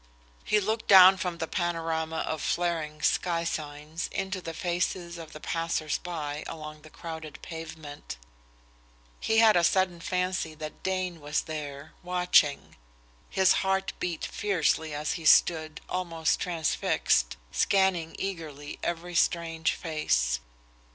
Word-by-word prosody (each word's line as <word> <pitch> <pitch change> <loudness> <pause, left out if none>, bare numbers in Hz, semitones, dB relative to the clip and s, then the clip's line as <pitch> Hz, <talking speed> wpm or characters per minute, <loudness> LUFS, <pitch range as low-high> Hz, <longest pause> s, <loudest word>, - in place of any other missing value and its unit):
He 210 - +3
looked 220 +3 -2
down 190 -1 +9
from 180 -1 -3
the 160 - -2
panorama 165 -2 -1
of 160 -2 -2
flaring 165 -3 -1
sky 170 -2 +1
signs 155 0 -4
into 190 -1 -3
the 165 -2 -6
faces 175 0 -2
of 160 -1 -9
the 155 - -9
passers 165 -2 -1
by 155 -4 -4
along 155 -1 -8
the 155 - -14
crowded 160 -2 -8
pavement. 160 - -8 1.0
He 220 - +1
had 225 -2 +7
a 175 - +4
sudden 185 0 +2
fancy 180 -2 -1
that 155 0 -8
Dane 185 -2 -2
was 150 +1 0
there, 145 -2 -7
watching. 180 -5 +2 0.5
His 190 -1 +4
heart 190 0 0
beat 175 -3 -2
fiercely 165 -5 0
as 150 +1 -2
he - - -9
stood, 155 -1 +4
almost 165 -3 0
transfixed, 160 - +1
scanning 190 -4 +2
eagerly 155 -7 -5
every 175 +1 -3
strange 165 -2 +1
face. - - 0
165 Hz, 130 wpm, -28 LUFS, 155-180 Hz, 1.0 s, down